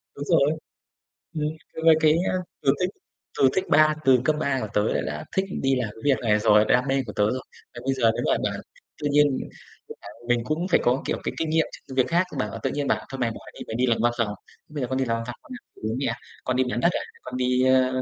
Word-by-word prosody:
Đúng 145 - -5
rồi. 145 +1 +3 0.8
Ừm, 150 -1 -1 0.3
c 160 - -5
với 160 -1 +8
cái 155 -1 +5 0.2
á - - -2 0.3
từ 135 0 +4
thích 180 - +2 0.5
từ 135 - +6
thích 190 - +1
ba 155 0 +5
từ 130 -2 +6
cấp 150 +3 +2
3 135 -3 0
của 110 - -3
tớ 105 - +2
là - - 0
đã 75 +1 -5
thích 190 0 +2 0.2
đi 135 0 +2
làm 125 -4 -1
cái 110 - -14
việc 140 -3 +3
này 105 -2 +2
rồi, 105 0 +5
đam 125 +2 +3
mê 135 0 +1
của 105 - -6
tớ 105 - +1
rồi. 130 0 -2 0.3
Mà - - -6
bây 135 - +2
giờ 115 -4 +3
nếu - - -2
mà - - +3
bảo - - -5 0.4
tự 145 - 0
nhiên 145 0 +5 0.6
cũng - - -10
phải 100 - -10 0.2
mình 120 -1 +2
cũng 160 +5 -1
phải 180 - +4
có, 125 +2 +2
kiểu, - - -1
cái - - -2
kinh 160 -1 -1
nghiệm 160 0 +3 0.2
trước 135 - -8
việc 130 - +4
khác, 175 +2 +2
bảo 110 0 -3
tự - - +1
nhiên 145 -1 -2
bảo: - - 0
"Thôi 135 - -6
mày 120 -2 +1
bỏ - - -8
đi, - - -13
mày 110 - -4
đi 125 +1 +2
làm 115 -2 +2
văn 120 0 +2
phòng", 105 -3 0 0.4
"Bây 150 -2 -5
giờ 125 - -1
con 130 +1 -2
đi 135 - +1
làm 115 -1 0
văn 115 - -4
phòng 120 - -5
con - - -17
ăn - - -69
của - - -18
bố 115 - -2
mẹ 140 - -1
à, - - -2 0.3
con 130 - -1
đi 130 - +3
bán 120 - -1
đất 170 - +4
à, - - -2 0.2
con - - -6
đi, 125 0 +2
ơ," 130 0 +3
130 Hz, 285 wpm, -25 LUFS, 120-150 Hz, 0.8 s, với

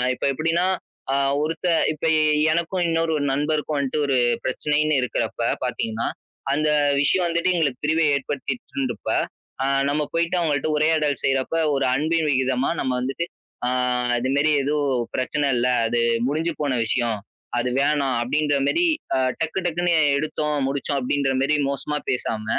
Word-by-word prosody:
இப்ப - - -4
எப்படின்னா, 165 +5 0 0.5
அ - - +2 0.3
ஒருத்த 165 +3 -2 0.3
இப்ப 155 - -15 0.2
எ - - +3 0.3
எனக்கும், 170 +2 -1
இன்னொரு 165 0 +1
ஒரு 145 - -1
நண்பருக்கும் 150 +1 -1
வன்ட்டு 140 +2 -1
ஒரு 135 -2 +2 0.3
பிரச்சனைன்னு 150 +3 +1
இருக்கிறப்ப 125 - -2 0.3
பார்த்தீங்கன்னா, 110 +1 -2 0.5
அந்த 155 +1 +1 0.3
விஷயம் 180 +5 +2
வந்துட்டு 170 +2 +1
எங்களுக்கு 140 -7 -1
பிரிவை 160 +1 +2
ஏற்படுத்திடுச்சுன்றப்ப, 135 -3 -4 0.6
அ - - +1 0.2
நம்ம 150 +1 0
போயிட்டு 170 +2 +1
அவங்கள்ட்ட 155 -2 0
உரையாடல் 155 -2 +1
செய்றப்ப 135 +3 0 0.2
ஒரு 135 -1 +1
அன்பின் 160 +2 +1
விகிதமா 130 +1 +1
நம்ம 130 - -1
வந்துட்டு, 135 +6 -2 0.4
"ஆ - - +2 0.5
இது 130 +2 -2
மேரி 155 +2 +3
எதுவும் 140 -4 0
பிரச்சனை 145 +3 0
இல்ல. 120 +1 +2 0.2
அது 120 +1 0 0.3
முடிஞ்சு 160 +3 -1
போன 140 -4 0
விஷயம். 120 -4 0 0.4
அது 125 +1 0
வேணாம்." 140 -3 +1
அப்படின்ற 145 +4 +1
மேரி 345 - +2 0.3
அ - - +2 0.2
டக்கு 160 +4 -1
டக்குன்னு 175 +1 0 0.2
எடுத்தோம், 150 0 -1
முடிச்சோம் 140 0 -1
அப்படின்ற 135 +1 0
மேரி 145 +3 +2
மோசமா 145 +2 -2
பேசாம, 110 -3 -2
145 Hz, 145 wpm, -23 LUFS, 130-155 Hz, 0.6 s, எ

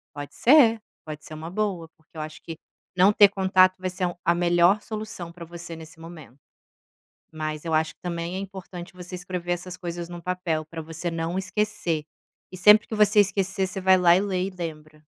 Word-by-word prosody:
Pode 145 0 -8
ser, 235 -5 +5 0.2
pode 155 -1 -8
ser - - -10
uma 160 +2 -7
boa, 190 -4 -2
porque 160 +1 -20
eu - - -4
acho 155 0 -8
que 165 -1 -8 0.4
não 185 +3 +5
ter 205 -1 +7
contato 185 -2 +3
vai 185 0 -2
ser 185 0 -2
um 175 - -5
a 170 +1 +3
melhor 175 +3 +3
solução 215 -6 -6
para 170 0 -10
você 170 0 -9
nesse 160 0 -12
momento, 160 -6 -12 0.9
mas 155 -1 -5
eu 165 - -2
acho 155 0 +1
que - - -50
também 170 0 -4
é - - -3
importante 190 -2 -8
você 180 0 -10
escrever 180 -1 -4
essas 175 +1 -4
coisas 175 -1 -6
num 175 - -7
papel 170 -3 -2
para 160 +1 -7
você 165 +2 -5
não 165 +2 -3
esquecer, 190 -5 -2 0.5
e 185 - -8
sempre 210 +4 +6
que 220 - -4
você 210 0 +4
esquecer 195 -1 +1
você 195 +1 -5
vai 190 0 +5
lá 175 -1 +5
e 185 - +2
lê 190 -2 -1
e 195 - -3
lembra. 155 -4 -8
175 Hz, 205 wpm, -25 LUFS, 165-190 Hz, 0.9 s, ter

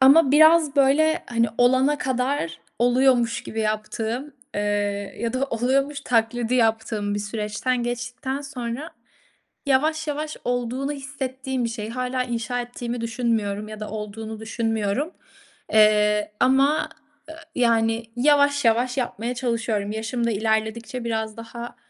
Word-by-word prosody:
Ama 275 +2 +7
biraz, 315 0 +6
böyle, 310 +4 +3
hani, 230 -1 +1
olana 260 +4 +4
kadar 255 - -1 0.2
oluyormuş 245 -1 +3
gibi 225 - -4
yaptığım, 220 +5 -2 0.2
eee, - - -1 0.6
ya 235 -1 -2
da 255 +1 0
oluyormuş 275 +4 0
taklidi 235 -1 +1
yaptığım 220 -3 +1
bir - - -1
süreçten 210 +4 -2
geçtikten 250 +3 -3
sonra 270 +2 -5 0.8
yavaş 310 +4 +2
yavaş 300 +1 -3
olduğunu 245 +3 -1
hissettiğim 265 -2 -4
bir - - 0
şey. 225 -2 -5
Hâlâ 255 +1 -1
inşa 245 0 -2
ettiğimi 245 0 -5
düşünmüyorum 225 -3 -1
ya 215 0 -8
da 215 - -5
olduğunu 215 +1 -6
düşünmüyorum, 225 - -1 0.6
eee, 210 -1 +4
ama, 280 +4 +3 0.4
ııı, 320 - -9 0.2
yani, 230 -2 +2
yavaş 285 +2 +4
yavaş 240 +2 +2
yapmaya 240 -2 -2
çalışıyorum. 230 -4 -1
Yaşım 225 +2 -2
da - - +1
ilerledikçe 220 +3 -1
biraz 220 -2 -2
daha, 235 +1 -8
240 Hz, 125 wpm, -24 LUFS, 225-265 Hz, 0.8 s, Ama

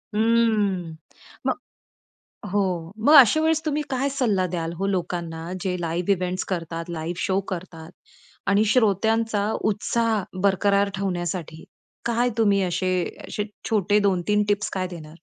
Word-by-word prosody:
हम्म. 210 -7 +2 0.5
मग - - +2 1.0
हो 205 +1 +2 0.5
मग 300 - +7
अशावेळेस 315 +5 +6
तुम्ही 300 0 0
काय 270 +1 0
सल्ला 220 -9 +1
द्याल 165 -1 -3
हो 195 +2 -1
लोकांना, 170 -3 -3
जे 185 -1 -1
लाईव्ह 170 +3 -1
इव्हेंट्स 185 -1 -1
करतात, 165 -2 -3
लाईव्ह 170 +1 -4
शो 190 0 +1
करतात. 170 -3 -7 0.6
आणि 200 +1 +4
श्रोत्यांचा 220 -1 +2 0.2
उत्साह 220 0 0 0.2
बरकरार 200 +1 +3
ठेवण्यासाठी 175 -4 -3 0.4
काय 235 +1 +1
तुम्ही 200 -3 +3
असे 185 +1 -1 0.4
असे 210 - -2 0.3
छोटे 210 -1 +3
2-3 200 +1 +2
टिप्स 205 0 0
काय 185 -1 -1
देणार? 160 -3 -10
195 Hz, 125 wpm, -24 LUFS, 175-220 Hz, 1.0 s, मग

